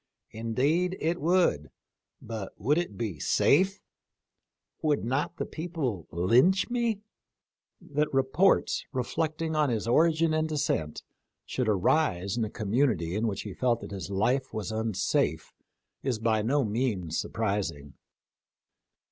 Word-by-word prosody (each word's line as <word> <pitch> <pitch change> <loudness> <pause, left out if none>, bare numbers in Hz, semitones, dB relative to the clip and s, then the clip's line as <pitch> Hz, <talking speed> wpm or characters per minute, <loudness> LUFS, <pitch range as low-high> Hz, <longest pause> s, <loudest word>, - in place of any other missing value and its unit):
Indeed 140 +12 0
it 170 +2 -1
would, 170 - +2 0.5
but 110 -3 -6
would 145 - +2
it 170 - -4
be 105 -10 -3
safe? 190 +7 +2 1.0
Would 150 -6 +1
not 135 +7 -1
the - - -2
people 155 - -4
lynch 125 - +3
me? 235 -4 0 0.4
" - - -55
That 150 0 +2
reports 135 +8 +2
reflecting 155 +4 -2
on 150 -2 +2
his 115 -2 -1
origin 160 +5 +3
and 155 0 0
descent 140 - -1 0.4
should 125 -4 -1
arise 100 - +1
in 120 - 0
a 110 - -2
community 105 - 0
in 110 +2 0
which 100 -3 -3
he 105 - -6
felt 120 0 +1
that - - -8
his 95 -1 -5
life 125 +7 0
was 110 -1 -4
unsafe 110 -3 -1 0.5
is 130 -4 -1
by 110 -1 +1
no 135 +5 +1
means 105 -7 -1
surprising. 100 -10 -2
125 Hz, 130 wpm, -28 LUFS, 105-155 Hz, 1.0 s, lynch